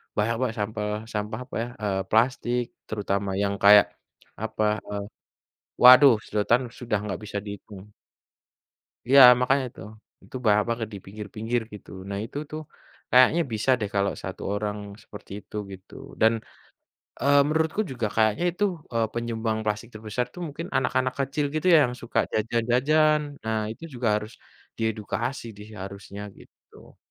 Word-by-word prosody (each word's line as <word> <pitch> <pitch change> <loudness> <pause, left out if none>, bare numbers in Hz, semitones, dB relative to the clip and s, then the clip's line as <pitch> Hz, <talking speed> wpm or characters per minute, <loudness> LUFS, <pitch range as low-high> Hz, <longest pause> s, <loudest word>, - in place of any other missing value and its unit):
banyak 110 +2 +1
Mbak 130 -3 0
sampah 105 0 -2 0.3
sampah 105 +3 -3
apa - - -10
ya, - - -5
eee, 100 -2 0
plastik 120 +1 +2 0.2
terutama 100 -1 -2
yang 100 0 0
kayak, 105 0 +9 0.6
apa, 110 -1 -2 0.3
e - - -7 0.9
waduh, 125 +1 +10
sedotan 110 +4 +2 0.2
sudah 115 -4 -1
nggak 105 - -4
bisa 100 0 -4
dihitung. 100 -1 -9 1.2
Iya, 135 +2 +7 0.2
makanya 135 +2 +2
itu, - - -14 0.4
itu - - -13
banyak 105 0 +4
banget 115 -2 -2
di - - -5
pinggir-pinggir 110 +4 -3
gitu. 105 - -11 0.2
Nah 100 - -3
itu 140 - -8
tuh, 155 0 -5 0.5
kayaknya 130 +7 +6
bisa 110 +5 -2
deh 105 -2 -2
kalau 100 0 +2
1 95 - -6
orang 105 0 -2 0.3
seperti 105 -1 -13
itu - - -15 0.2
gitu 95 -1 -12 0.3
dan, 110 +1 +6 0.9
eee, 140 +1 +4
menurutku 160 +5 0
juga 120 -4 -2
kayaknya 110 +9 +2
itu, 205 +4 -1 0.3
eee, 115 -1 +1
penyumbang 115 -2 -2
plastik 105 +2 -2
terbesar 110 +3 -3
tuh 180 - -9
mungkin 155 +4 -6
anak-anak 130 0 0
kecil 140 +2 -1
gitu 155 +4 -1
ya - - +8
yang 125 - -5
suka 120 - -2
jajan-jajan. 125 +8 +2 0.2
Nah, 110 0 0
itu 140 - -17
juga 120 -2 -1
harus, 105 +2 -5 0.4
di - - -5
edukasi 115 +4 -4
di - - -9
seharusnya 100 0 -8 0.2
gitu. - - -19
110 Hz, 150 wpm, -25 LUFS, 105-130 Hz, 1.2 s, waduh